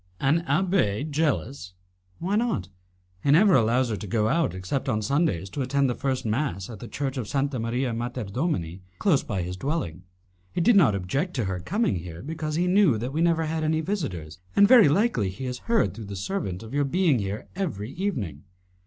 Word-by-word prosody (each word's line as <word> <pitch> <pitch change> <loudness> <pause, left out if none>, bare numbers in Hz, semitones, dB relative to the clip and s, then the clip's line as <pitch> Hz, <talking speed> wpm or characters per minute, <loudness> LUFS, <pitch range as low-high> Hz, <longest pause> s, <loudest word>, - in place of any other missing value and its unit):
"An 150 +5 +2
abbé 155 - +1
jealous?" 140 - -1 0.4
"Why 190 +4 -1
not? 215 - 0 0.5
He - - 0
never 185 +7 +6
allows 120 0 +3
her - - 0
to 105 - -7
go 110 +2 +1
out 165 - +1
except 95 +10 -3
on 110 -3 0
Sundays 120 - +1
to 140 - -3
attend 135 0 +1
the - - 0
first 130 0 -2
mass 110 - -2
at 110 - -9
the 120 - -8
Church 135 +1 -3
of 120 -5 -3
Santa 140 -1 -1
Maria 120 +2 -1
Mater 120 0 -3
Domini, 100 - -2 0.2
close 170 -9 +3
by 95 -4 -3
his 90 +1 -4
dwelling. 130 - -3 0.5
He - - -1
did 230 +6 +5
not 140 - +5
object 135 - -2
to 120 -5 0
her 95 -1 -2
coming 190 - 0
here, 85 -1 -8
because 155 +1 -4
he 175 +2 +1
knew 180 - +4
that 125 +5 -4
we 160 - 0
never 165 -1 +2
had 160 0 -2
any 155 +1 +1
visitors, 95 - -4 0.2
and 200 - +7
very 230 - +8
likely 155 - +2
he 100 +8 -6
has 125 0 -4
heard 230 -1 +3
through 115 - -8
the 100 0 -7
servant 95 - -3
of 110 +3 -10
your 145 0 +2
being 155 -2 +2
here 100 +1 -4
every 135 - -3
evening." 125 - -3
135 Hz, 205 wpm, -26 LUFS, 105-165 Hz, 0.5 s, very